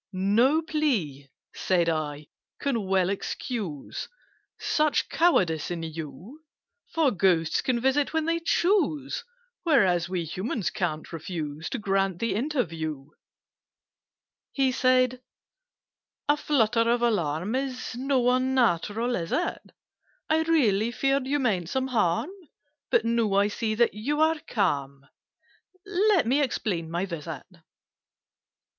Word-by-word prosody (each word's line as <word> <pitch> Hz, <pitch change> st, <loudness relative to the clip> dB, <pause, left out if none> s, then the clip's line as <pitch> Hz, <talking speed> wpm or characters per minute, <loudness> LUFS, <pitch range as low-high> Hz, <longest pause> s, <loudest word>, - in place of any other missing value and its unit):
"No 225 Hz, -, +3 dB
plea," 215 Hz, -, -1 dB, 0.2 s
said 175 Hz, -3 st, +1 dB
I, 150 Hz, -2 st, -2 dB, 0.3 s
"can 235 Hz, -8 st, -1 dB
well 190 Hz, -1 st, +2 dB
excuse 200 Hz, -, -4 dB, 0.5 s
Such 305 Hz, -1 st, +1 dB
cowardice 180 Hz, -, +2 dB
in 170 Hz, -2 st, -4 dB
you: 165 Hz, -, -8 dB, 0.5 s
For 320 Hz, -5 st, +2 dB
Ghosts 180 Hz, -5 st, +2 dB
can 255 Hz, -3 st, 0 dB
visit 265 Hz, +3 st, +1 dB
when 320 Hz, -1 st, 0 dB
they 335 Hz, +1 st, +1 dB
choose, 335 Hz, -, +1 dB, 0.4 s
Whereas 190 Hz, -, +3 dB
we 180 Hz, -3 st, -2 dB
Humans 190 Hz, -, -3 dB
ca'n't 160 Hz, -3 st, -3 dB
refuse 160 Hz, -2 st, -5 dB
To 265 Hz, -, -3 dB
grant 195 Hz, -3 st, 0 dB
the 230 Hz, +4 st, -1 dB
interview." 165 Hz, -, -2 dB, 1.4 s
He 270 Hz, -2 st, +2 dB
said 255 Hz, 0 st, +2 dB, 1.1 s
"A 290 Hz, -, +4 dB
flutter 230 Hz, -6 st, +2 dB
of 240 Hz, 0 st, +2 dB
alarm 180 Hz, -3 st, 0 dB
Is 260 Hz, -2 st, -3 dB
not 255 Hz, -1 st, +2 dB
unnatural, 240 Hz, -3 st, +1 dB
is 165 Hz, -1 st, -4 dB
it? 350 Hz, -, -1 dB, 0.7 s
I 315 Hz, 0 st, +4 dB
really 235 Hz, -10 st, +2 dB
feared 270 Hz, +2 st, 0 dB
you 290 Hz, +2 st, +1 dB
meant 195 Hz, -, 0 dB
some 265 Hz, +3 st, -1 dB
harm: 225 Hz, -, +1 dB, 0.6 s
But, -, -, +3 dB
now 230 Hz, -3 st, +1 dB
I 200 Hz, +1 st, +3 dB
see 215 Hz, +1 st, -2 dB
that 235 Hz, +1 st, +3 dB
you 275 Hz, +8 st, -2 dB
are 315 Hz, 0 st, +3 dB
calm, 140 Hz, -, -1 dB, 0.8 s
Let 400 Hz, -, +2 dB
me 265 Hz, +6 st, +2 dB
explain 195 Hz, -, -1 dB
my 175 Hz, +3 st, -1 dB
visit. 165 Hz, -5 st, -6 dB
225 Hz, 120 wpm, -26 LUFS, 175-270 Hz, 1.4 s, A